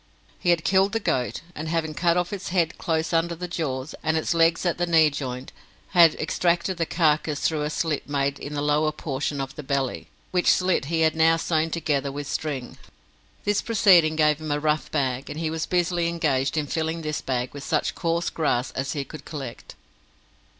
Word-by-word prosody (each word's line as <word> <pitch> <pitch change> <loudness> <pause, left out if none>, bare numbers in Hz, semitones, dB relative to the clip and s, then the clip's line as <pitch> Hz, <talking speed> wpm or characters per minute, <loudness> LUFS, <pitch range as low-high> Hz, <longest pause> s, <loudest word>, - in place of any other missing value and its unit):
He 175 - 0
had 170 -2 +3
killed 195 +1 +3
the 225 - +1
goat, 130 - -1
and 155 0 -5
having 160 -1 -1
cut 170 +2 +2
off 180 +2 -1
its 195 -2 -5
head 175 -3 0
close 160 0 -1
under 170 +1 +1
the 180 +2 -5
jaws, 145 -5 -3
and 160 0 +1
its 160 - 0
legs 165 +1 +3
at 175 -1 0
the 175 - +1
knee 160 -2 +5
joint, 130 -2 -5 0.4
had 170 -4 +6
extracted 175 +1 0
the 165 -1 -1
carcase 155 -3 +1
through 155 -2 0
a 150 - -1
slit 155 -2 -2
made 140 -1 0
in 145 +1 -6
the 145 - -1
lower 150 +1 +2
portion 145 -1 -3
of 135 0 -4
the - - -6
belly, 135 -2 -2 0.2
which 180 -1 +2
slit 185 -6 +2
he 165 +2 0
had 160 0 +3
now 165 +1 +4
sewn 160 -1 0
together 150 -4 -1
with 145 +1 -5
string. 140 -4 -4 0.6
This 205 0 +1
proceeding 185 -8 +4
gave 150 -1 +3
him 155 - -5
a 145 0 0
rough 150 0 0
bag, 135 -3 -1
and 150 - -5
he 160 -1 -1
was 160 0 -3
busily 175 -1 +1
engaged 150 -5 0
in 150 - +1
filling 160 +2 -2
this 155 0 -2
bag 125 -1 -2
with 145 -1 -8
such - - 0
coarse 170 -1 -1
grass 140 -6 0
as 135 +1 -3
he 145 -3 -2
could 155 0 -10
collect. 135 -7 -8
155 Hz, 205 wpm, -25 LUFS, 145-170 Hz, 0.6 s, had